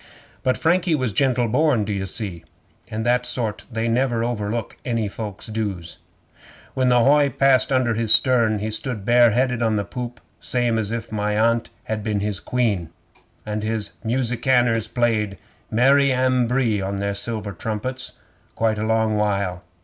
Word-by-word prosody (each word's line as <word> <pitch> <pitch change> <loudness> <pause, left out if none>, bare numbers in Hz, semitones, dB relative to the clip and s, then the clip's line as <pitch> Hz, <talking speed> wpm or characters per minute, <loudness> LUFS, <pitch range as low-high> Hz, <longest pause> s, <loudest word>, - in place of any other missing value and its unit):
'But 130 - +1
Frankie 170 0 +2
was 130 -7 -1
gentle 125 +1 +2
born, 130 -1 +2
d'ye 100 -2 -2
see, 95 -3 -5 0.5
and 110 +1 -3
that 125 +1 +2
sort 115 -4 -2
they 115 0 -1
never 120 0 +1
overlook 115 -1 -3
any 115 -3 -1
folks' 105 -1 -7
dues. 100 -7 -4 0.7
'When 130 -1 +1
the 120 -1 +4
hoy 145 +1 +5
passed 135 0 +3
under 130 -3 +2
his 110 -1 0
stern, 115 -2 +4
he 110 +2 -3
stood 110 -2 -4
bare 120 0 +6
headed 125 +1 0
on 110 -2 +2
the 100 - 0
poop 125 -1 -6 0.2
same 120 -2 0
as 105 -1 -3
if 115 -1 -4
my 105 0 -1
Aunt 115 +1 +2
had 110 -1 -3
been 105 -1 -1
his 100 -2 -2
Queen, 105 -10 -1 0.6
and 105 0 -3
his 110 -1 -2
musicianers 120 -1 +1
played 110 -4 0 0.3
"Mary 135 +4 +4
Ambree" 125 -3 +1
on 95 +1 -3
their 100 0 -2
silver 105 0 -3
trumpets 125 +5 -4 0.4
quite 110 -1 0
a 110 - -1
long 110 -1 +1
while. 100 -4 -1
115 Hz, 160 wpm, -22 LUFS, 105-125 Hz, 0.7 s, bare